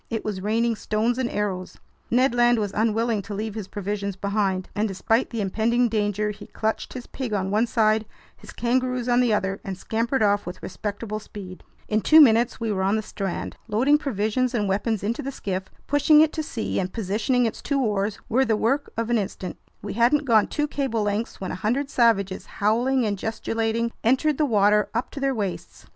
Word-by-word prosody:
It 225 Hz, -2 st, -3 dB
was 205 Hz, -3 st, -3 dB
raining 225 Hz, +3 st, +1 dB
stones 225 Hz, +4 st, 0 dB
and 250 Hz, -2 st, 0 dB
arrows. 190 Hz, -3 st, -3 dB, 0.3 s
Ned 250 Hz, +1 st, +3 dB
Land 240 Hz, 0 st, +4 dB
was 205 Hz, -3 st, -2 dB
unwilling 225 Hz, 0 st, +1 dB
to 200 Hz, +1 st, -7 dB
leave 215 Hz, +1 st, -3 dB
his 210 Hz, -3 st, -6 dB
provisions 200 Hz, -1 st, -3 dB
behind, 195 Hz, -2 st, -1 dB
and 215 Hz, +2 st, 0 dB
despite 225 Hz, +4 st, 0 dB
the 230 Hz, -3 st, -3 dB
impending 230 Hz, +5 st, +1 dB
danger, 210 Hz, -1 st, 0 dB
he 210 Hz, -, -11 dB
clutched 220 Hz, 0 st, -3 dB
his 250 Hz, -1 st, -7 dB
pig 255 Hz, -5 st, -5 dB
on 190 Hz, -1 st, -1 dB
one 220 Hz, +3 st, +2 dB
side, 220 Hz, -1 st, +2 dB, 0.3 s
his -, -, -13 dB
kangaroos 250 Hz, 0 st, 0 dB
on 245 Hz, 0 st, +3 dB
the 245 Hz, -2 st, +3 dB
other, 195 Hz, -2 st, 0 dB
and 190 Hz, -2 st, -5 dB
scampered 230 Hz, +5 st, 0 dB
off 205 Hz, 0 st, +3 dB
with 180 Hz, +1 st, -7 dB
respectable 210 Hz, +3 st, -4 dB
speed. 195 Hz, -3 st, -10 dB, 0.3 s
In 215 Hz, 0 st, +1 dB
two 310 Hz, +7 st, +7 dB
minutes 235 Hz, -4 st, +5 dB
we 225 Hz, -2 st, -1 dB
were 190 Hz, -2 st, -1 dB
on 195 Hz, +2 st, +2 dB
the 220 Hz, -, -1 dB
strand. 195 Hz, -3 st, -4 dB
Loading 260 Hz, +7 st, +3 dB
provisions 250 Hz, -1 st, -1 dB
and 210 Hz, -3 st, 0 dB
weapons 205 Hz, +2 st, -1 dB
into 225 Hz, +3 st, -1 dB
the 275 Hz, -, -4 dB
skiff, 190 Hz, -7 st, -4 dB, 0.2 s
pushing 290 Hz, +2 st, +5 dB
it 310 Hz, -1 st, +3 dB
to 315 Hz, -, -2 dB
sea, 245 Hz, -7 st, -3 dB
and 185 Hz, -1 st, -2 dB
positioning 225 Hz, +4 st, 0 dB
its 225 Hz, -, -3 dB
two 280 Hz, -1 st, 0 dB
oars 205 Hz, -4 st, 0 dB
were 260 Hz, +4 st, +3 dB
the 225 Hz, -4 st, +1 dB
work 270 Hz, +7 st, 0 dB
of 230 Hz, +1 st, -1 dB
an 235 Hz, -, +3 dB
instant. 190 Hz, -2 st, -5 dB, 0.3 s
We -, -, -4 dB
hadn't 245 Hz, +6 st, +3 dB
gone 225 Hz, -5 st, +4 dB
two 295 Hz, -1 st, -1 dB
cable 265 Hz, -7 st, -1 dB
lengths 205 Hz, +2 st, -2 dB
when 190 Hz, -, -4 dB
a 180 Hz, -, -6 dB
hundred 270 Hz, +7 st, 0 dB
savages, 200 Hz, -6 st, +2 dB
howling 240 Hz, +5 st, +2 dB
and 205 Hz, -2 st, -2 dB
gesticulating, 225 Hz, +1 st, -1 dB
entered 265 Hz, +5 st, +2 dB
the 305 Hz, -, +4 dB
water 210 Hz, -2 st, +3 dB
up 235 Hz, -, -1 dB
to -, -, -7 dB
their 275 Hz, -1 st, 0 dB
waists. 180 Hz, -, -5 dB
220 Hz, 205 wpm, -24 LUFS, 205-240 Hz, 0.3 s, two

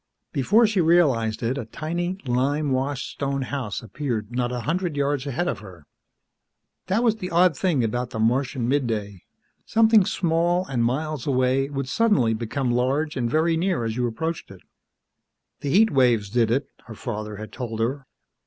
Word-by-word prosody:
Before 205 Hz, -, +4 dB
she 210 Hz, -3 st, +2 dB
realized 135 Hz, -11 st, +2 dB
it, 125 Hz, +4 st, -1 dB
a 120 Hz, -, -5 dB
tiny, 175 Hz, +8 st, -3 dB
lime 135 Hz, +4 st, 0 dB
washed 130 Hz, +1 st, -1 dB
stone 140 Hz, -1 st, -2 dB
house 125 Hz, -6 st, -4 dB
appeared 115 Hz, -1 st, -4 dB
not 125 Hz, -1 st, 0 dB
a 125 Hz, -1 st, -3 dB
hundred 170 Hz, +2 st, -2 dB
yards 140 Hz, -1 st, 0 dB
ahead 140 Hz, +6 st, -1 dB
of -, -, -2 dB
her. 90 Hz, -7 st, -13 dB, 1.0 s
That 200 Hz, +5 st, +1 dB
was 225 Hz, -2 st, +2 dB
the 185 Hz, -4 st, -5 dB
odd 175 Hz, -1 st, +4 dB
thing 155 Hz, -5 st, +1 dB
about 120 Hz, +2 st, -1 dB
the -, -, -6 dB
Martian 125 Hz, +2 st, +1 dB
midday; 110 Hz, -8 st, -1 dB, 0.4 s
something 220 Hz, -2 st, +5 dB
small 175 Hz, +1 st, +1 dB
and 125 Hz, -7 st, -1 dB
miles 150 Hz, +3 st, -2 dB
away 130 Hz, 0 st, +2 dB
would 135 Hz, -2 st, -3 dB
suddenly 135 Hz, -, +2 dB
become 120 Hz, +3 st, -2 dB
large 135 Hz, +6 st, 0 dB
and 120 Hz, -2 st, -1 dB
very 160 Hz, +4 st, +2 dB
near 175 Hz, -5 st, 0 dB
as 110 Hz, -1 st, -2 dB
you 125 Hz, 0 st, 0 dB
approached 160 Hz, +8 st, -4 dB
it. 95 Hz, -2 st, -13 dB, 1.0 s
The 145 Hz, -, -3 dB
heat 215 Hz, +9 st, +4 dB
waves 120 Hz, -7 st, +2 dB
did 115 Hz, -1 st, +2 dB
it, 135 Hz, +5 st, +1 dB, 0.2 s
her 115 Hz, -, -9 dB
father 105 Hz, -2 st, -5 dB
had 110 Hz, +1 st, -8 dB
told 115 Hz, -4 st, -5 dB
her. 135 Hz, +4 st, -2 dB
135 Hz, 170 wpm, -24 LUFS, 120-160 Hz, 1.0 s, something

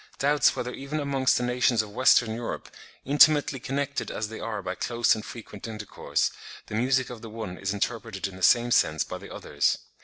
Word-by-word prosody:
"doubts 145 Hz, +1 st, +3 dB
whether 125 Hz, +1 st, -4 dB
even 140 Hz, +3 st, -4 dB
amongst 140 Hz, -2 st, +2 dB
the 125 Hz, -, -1 dB
nations 125 Hz, -2 st, +2 dB
of 105 Hz, -, -11 dB
Western 120 Hz, -2 st, +4 dB
Europe, 115 Hz, +1 st, -5 dB, 0.4 s
intimately 145 Hz, 0 st, +5 dB
connected 140 Hz, +3 st, -3 dB
as 110 Hz, -1 st, -4 dB
they 110 Hz, -, -7 dB
are 105 Hz, -3 st, -4 dB
by -, -, -3 dB
close 120 Hz, -1 st, +1 dB
and 110 Hz, -, -4 dB
frequent 110 Hz, -3 st, -9 dB
intercourse, 110 Hz, -2 st, -2 dB, 0.3 s
the -, -, -10 dB
music 130 Hz, +4 st, +1 dB
of 120 Hz, -3 st, -9 dB
the 115 Hz, -, -8 dB
one 110 Hz, -4 st, -6 dB
is 95 Hz, +1 st, -3 dB
interpreted 110 Hz, 0 st, -3 dB
in 95 Hz, -, -11 dB
the 95 Hz, -, -11 dB
same 120 Hz, +5 st, +4 dB
sense 80 Hz, -8 st, +3 dB
by -, -, -7 dB
the -, -, -11 dB
others. 70 Hz, 0 st, 0 dB
120 Hz, 195 wpm, -26 LUFS, 110-130 Hz, 0.4 s, intimately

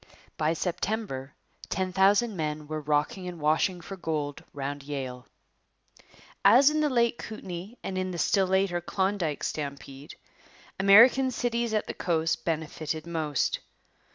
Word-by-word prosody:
By 155 Hz, +1 st, +1 dB
September 170 Hz, -6 st, -3 dB, 0.3 s
ten 185 Hz, 0 st, -2 dB
thousand 200 Hz, +4 st, +3 dB
men 150 Hz, -2 st, -3 dB
were 155 Hz, 0 st, -4 dB
rocking 150 Hz, +5 st, 0 dB
and 175 Hz, -2 st, -7 dB
washing 160 Hz, +4 st, +1 dB
for 195 Hz, -, -7 dB
gold 155 Hz, -5 st, -3 dB
round 140 Hz, 0 st, -4 dB
Yale. 135 Hz, -3 st, -6 dB, 1.2 s
As 275 Hz, +5 st, +7 dB
in 305 Hz, 0 st, 0 dB
the 300 Hz, -, +2 dB
late 235 Hz, -2 st, +2 dB
Kootenay 195 Hz, -1 st, -7 dB
and 185 Hz, -1 st, -3 dB
in 185 Hz, 0 st, -2 dB
the 180 Hz, -, -5 dB
still 190 Hz, +2 st, +2 dB
later 190 Hz, -2 st, +1 dB
Klondike 190 Hz, -4 st, -1 dB
stampede, 140 Hz, -1 st, -5 dB, 0.6 s
American 235 Hz, +7 st, +7 dB
cities 235 Hz, -2 st, -1 dB
at 215 Hz, -, 0 dB
the -, -, -5 dB
coast 160 Hz, -2 st, 0 dB
benefited 160 Hz, -1 st, -3 dB
most. 160 Hz, -4 st, -1 dB
175 Hz, 135 wpm, -28 LUFS, 150-200 Hz, 1.2 s, As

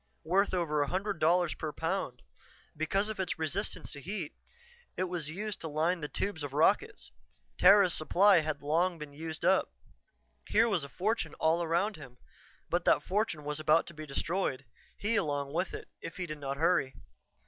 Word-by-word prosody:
Worth 190 Hz, +5 st, +2 dB
over 160 Hz, -5 st, 0 dB
a 145 Hz, -, +1 dB
hundred 195 Hz, +2 st, -2 dB
dollars 175 Hz, +1 st, +3 dB
per 155 Hz, -, -4 dB
pound. 160 Hz, -6 st, -3 dB, 0.5 s
Because 195 Hz, +7 st, 0 dB
of 215 Hz, -2 st, -5 dB
its 190 Hz, -, -1 dB
resistance 175 Hz, +3 st, -3 dB
to 145 Hz, -, -8 dB
heat, 180 Hz, -1 st, -5 dB, 0.6 s
it -, -, +1 dB
was 175 Hz, -4 st, -3 dB
used 205 Hz, +5 st, -5 dB
to 165 Hz, -, -4 dB
line 160 Hz, +4 st, 0 dB
the 150 Hz, -, -4 dB
tubes 195 Hz, +1 st, -2 dB
of 145 Hz, -2 st, -5 dB
rockets; 210 Hz, -, +1 dB, 0.5 s
Terra's 195 Hz, -1 st, +7 dB
supply 190 Hz, +4 st, +5 dB
had 155 Hz, -2 st, -3 dB
long 170 Hz, +4 st, +1 dB
been 150 Hz, -2 st, -9 dB
used 160 Hz, +1 st, -5 dB
up. 190 Hz, +1 st, +3 dB, 0.8 s
Here 225 Hz, +2 st, +4 dB
was 195 Hz, -9 st, 0 dB
a 140 Hz, -, -7 dB
fortune 215 Hz, +9 st, -1 dB
all 160 Hz, +2 st, +2 dB
around 175 Hz, +5 st, 0 dB
him; 130 Hz, -5 st, -12 dB, 0.5 s
but 175 Hz, +1 st, 0 dB
that -, -, +4 dB
fortune 190 Hz, -6 st, -1 dB
was 150 Hz, +1 st, -3 dB
about 155 Hz, +1 st, +3 dB
to 170 Hz, -, -8 dB
be 155 Hz, -1 st, -8 dB
destroyed, 140 Hz, -1 st, -1 dB, 0.3 s
he 225 Hz, +3 st, 0 dB
along 145 Hz, -6 st, -1 dB
with 180 Hz, +2 st, -1 dB
it, -, -, -7 dB
if 165 Hz, -, -7 dB
he 180 Hz, -, -2 dB
did 155 Hz, -3 st, -7 dB
not 140 Hz, -1 st, -4 dB
hurry. 165 Hz, -4 st, +2 dB
165 Hz, 180 wpm, -31 LUFS, 150-190 Hz, 0.8 s, Terra's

